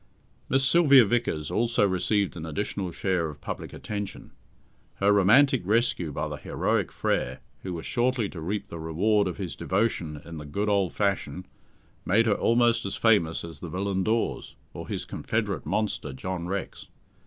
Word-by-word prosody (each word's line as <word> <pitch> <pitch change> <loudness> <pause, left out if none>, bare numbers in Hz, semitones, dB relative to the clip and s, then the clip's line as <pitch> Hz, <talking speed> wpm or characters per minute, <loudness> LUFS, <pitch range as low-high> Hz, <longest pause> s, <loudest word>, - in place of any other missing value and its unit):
Miss 135 +1 +3
Sylvia 140 -4 +7
Vickers 100 -9 -1
also 115 -3 +2
received 100 +1 0
an 80 - -6
additional 90 +3 -3
share 90 -2 -1
of 75 - -10
public - - -6
attention. 105 -2 -6 0.6
Her 100 +1 +3
romantic 125 +7 +5
rescue 100 -5 +1
by - - -3
the - - -5
heroic - - -1
Frere, 65 +1 -1 0.2
who 95 - -5
was 80 - -6
shortly 120 -2 +1
to 85 - -8
reap 100 +4 -3
the 85 - -7
reward 100 +6 +1
of 90 - -4
his 95 -4 -5
devotion 95 -7 -1
in 85 -1 -8
the 75 - -7
good 100 +8 -1
old 100 -3 +2
fashion, 100 -2 -1 0.6
made 115 +5 +3
her 110 - +3
almost 120 +2 +3
as 100 - -4
famous 100 -8 +2
as 80 -3 -10
the 85 - -7
villain 95 +2 -1
Dawes, 110 +3 -1 0.2
or - - -7
his - - -4
confederate 100 -10 -2
monster 105 -6 -1
John 90 +5 -4
Rex. 100 +1 -5
100 Hz, 165 wpm, -27 LUFS, 85-110 Hz, 0.6 s, Sylvia